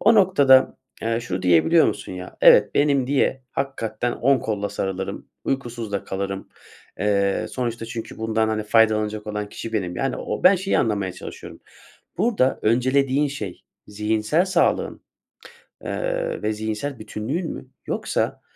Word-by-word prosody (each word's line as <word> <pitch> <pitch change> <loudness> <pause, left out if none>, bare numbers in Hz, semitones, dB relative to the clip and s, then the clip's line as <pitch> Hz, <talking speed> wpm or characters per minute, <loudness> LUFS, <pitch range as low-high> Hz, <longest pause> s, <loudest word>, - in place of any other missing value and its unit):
O 230 - +5
noktada, 145 -10 +5 0.3
eee, 115 +1 0
şunu 95 -6 -4
diyebiliyor 90 - +5
musun - - -3
ya, 90 0 -8
evet, - - +6
benim 140 -3 +3
diye 135 -1 +1
hakikaten 120 -3 -2
10 135 +1 +2
kolla 105 -2 -2
sarılırım, 95 -1 -4 0.2
uykusuz 120 -5 -3
da 100 - -2
kalırım. 95 0 -4 0.5
Eee, 100 -1 +1
sonuçta 120 -2 -3
çünkü 115 -1 -7
bundan, 110 0 0
hani, 110 -1 -1
faydalanacak 110 -1 +2
olan 105 -1 -3
kişi 115 - -7
benim. 90 -5 -2
Yani, 135 -1 -1
o - - -4
ben 190 +2 +8
şeyi 190 +2 0
anlamaya 100 -4 0
çalışıyorum. - - -10 0.6
Burada 200 - +2
öncelediğin 130 +5 +2
şey 105 -10 -6 0.2
zihinsel 110 - 0
sağlığın, 185 -2 +1 0.8
eee, - - -2
ve 110 0 0
zihinsel 110 +5 -4
bütünlüğün 120 +11 -4
mü - - -9 0.2
yoksa, - - -1
115 Hz, 140 wpm, -23 LUFS, 105-135 Hz, 0.8 s, ben